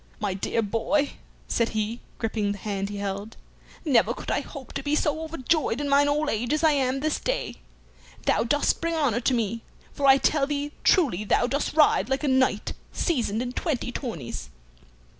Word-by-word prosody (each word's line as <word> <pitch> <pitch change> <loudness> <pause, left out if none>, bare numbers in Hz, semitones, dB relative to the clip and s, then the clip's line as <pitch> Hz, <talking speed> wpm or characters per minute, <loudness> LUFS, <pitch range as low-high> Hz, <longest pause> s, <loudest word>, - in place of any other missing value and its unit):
"My 205 -3 -1
dear 210 +4 -1
boy," 230 +8 0 0.4
said 230 -1 +1
he, 215 +3 -1 0.2
gripping 215 -3 -1
the - - -8
hand 200 -1 -3
he 205 - -5
held, 200 +2 -4 0.5
"never 260 -7 +3
could - - -5
I - - +1
hope 275 -4 -10
to 275 - -3
be 290 +2 0
so 305 +1 0
overjoyed 315 -4 0
in 290 - -2
mine 285 +1 +4
old 300 +1 +1
age 235 +2 0
as 310 - 0
I 315 - +6
am 270 -2 +1
this 310 0 0
day. - - -2 0.7
Thou - - +3
dost 290 +5 +1
bring 335 0 0
honor 275 -8 +1
to 250 +1 +1
me, 230 0 -1 0.3
for 280 - +1
I 270 0 +8
tell 275 0 +2
thee 290 0 -2
truly 265 - +3
thou 215 - +2
dost 280 +4 -1
ride 305 -3 +4
like 265 +2 0
a - - +1
knight 260 -5 +2 0.2
seasoned 240 - 0
in 245 - -4
twenty 260 -6 -2
tourneys." 220 - -5
260 Hz, 190 wpm, -26 LUFS, 220-295 Hz, 0.7 s, I